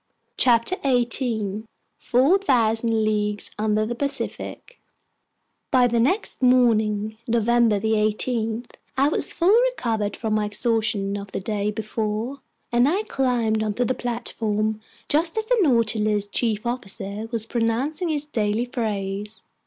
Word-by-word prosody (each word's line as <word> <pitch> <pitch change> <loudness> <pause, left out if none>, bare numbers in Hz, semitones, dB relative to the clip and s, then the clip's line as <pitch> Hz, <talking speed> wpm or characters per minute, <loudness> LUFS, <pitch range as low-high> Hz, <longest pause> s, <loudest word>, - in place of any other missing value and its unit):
CHAPTER 240 +8 +3
18 235 -5 0 0.3
Four 275 +11 +3
Thousand 225 - +2
Leagues 210 -1 -1
Under 215 0 +1
the 235 - -3
Pacific 280 - -3 0.9
BY 255 -2 +4
THE 235 0 +1
NEXT 285 - 0
MORNING, 220 -4 +2
November 235 -2 +3
18, 220 +2 0 0.3
I 275 +2 +4
was - - 0
fully 395 +8 +4
recovered 220 - -2
from 220 -2 -2
my 215 -1 +1
exhaustion 210 -2 0
of 200 -1 -8
the - - -2
day 205 +1 -2
before, 220 +4 -3 0.3
and 240 +3 +4
I 390 +7 0
climbed 240 - 0
onto 220 +3 0
the 255 - +1
platform 220 -3 -2 0.3
just 325 +6 +1
as 440 - 0
the - - +2
Nautilus's 215 - +2
chief 215 +1 -1
officer 215 -3 -1
was 225 -2 -1
pronouncing 250 +10 -1
his 300 -2 0
daily 220 -4 -1
phrase. 210 -3 -4
225 Hz, 130 wpm, -23 LUFS, 215-250 Hz, 0.9 s, BY